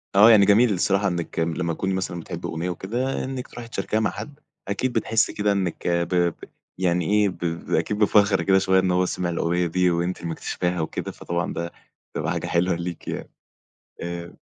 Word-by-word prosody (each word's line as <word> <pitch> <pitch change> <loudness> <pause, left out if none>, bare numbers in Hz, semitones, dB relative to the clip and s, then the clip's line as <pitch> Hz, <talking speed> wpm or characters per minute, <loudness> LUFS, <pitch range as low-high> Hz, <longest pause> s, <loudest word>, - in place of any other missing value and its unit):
اه 105 +3 +9
يعني 105 -3 +7
جميل 105 +3 +5
الصراحة 95 +2 +2
إنك 85 -3 -3
م 80 0 +1
لمّا 85 0 -1
تكوني 95 +3 -2
مثلًا 90 -2 -2
بتحبي 85 - -6
أغنية 85 +3 -3
وكده. 120 +9 -2
إنك 130 -1 -5
تروحي 120 -1 -9
تشاركيها 110 -1 -1
مع 110 -4 +1
حد. 145 +8 -8 0.3
أكيد 120 +6 -1
بتحسي 115 0 +1
كده 105 0 +1
إنك 95 -4 -2
ب 85 -1 +1
ب 85 -2 +2 0.4
يعني 90 -2 +1
ايه؟ 105 +2 +3
ب 90 - -9
ب 85 0 -4
أكيد 105 - +1
بفخر 105 -1 +4
كده 95 0 +4
شوية. 95 0 +3
إن 95 -1 +1
هو 90 +1 +3
سمع 90 -1 -2
الأغنية 85 +1 0
دي 90 +2 +2
وأنتِ 85 +2 -1
اللي 85 - -5
مكتشفاها 90 +1 -2
وكده، 80 - -4
فطبعًا 85 +1 -3
ده 85 0 -4 0.4
بتبقى - - -2
حاجة - - -2
حلوة 85 +1 +2
ليكِ 85 0 -6
يعني. - - -4 0.7
آآ 85 0 -5
90 Hz, 200 wpm, -24 LUFS, 85-105 Hz, 0.7 s, اه